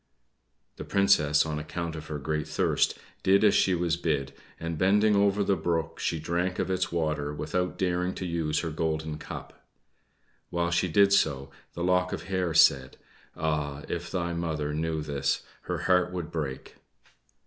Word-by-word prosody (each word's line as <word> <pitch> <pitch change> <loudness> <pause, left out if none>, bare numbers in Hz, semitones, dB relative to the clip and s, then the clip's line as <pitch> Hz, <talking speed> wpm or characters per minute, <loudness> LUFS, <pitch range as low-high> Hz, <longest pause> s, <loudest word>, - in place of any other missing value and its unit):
The - - -6
Princess, 80 -7 +3
on 75 -1 -3
account 80 +2 -4
of 80 0 -8
her 75 - -4
great 75 +1 -2
thirst, - - +1 0.2
did 100 +2 +4
as 105 - +6
she 95 - +3
was 85 -1 0
bid, 75 -5 -1 0.3
and 85 0 -3
bending 105 +3 +4
over 100 0 +3
the 100 0 +2
brook 85 -1 -2
she 85 - -1
drank 85 +3 -1
of - - -1
its 95 - 0
water 75 -3 -1
without 90 +5 -2
daring 90 0 0
to 95 - -4
use 80 -3 -1
her 80 - -3
golden 80 -1 -2
cup. - - -9 0.9
While 85 0 -1
she 85 +2 +2
did 100 +4 +4
so 70 -7 +1 0.2
the 85 - -4
lock 90 0 +2
of - - -4
hair 90 -3 -1
said, 65 -2 +4 0.4
"Ah! 75 -2 -2
if 85 0 -4
thy 85 -2 -2
mother 80 -3 -2
knew 80 0 -2
this, 70 -2 -1 0.3
her - - -1
heart 90 -1 +3
would 85 -3 -5
break." 75 -5 -5
85 Hz, 170 wpm, -28 LUFS, 75-90 Hz, 0.9 s, as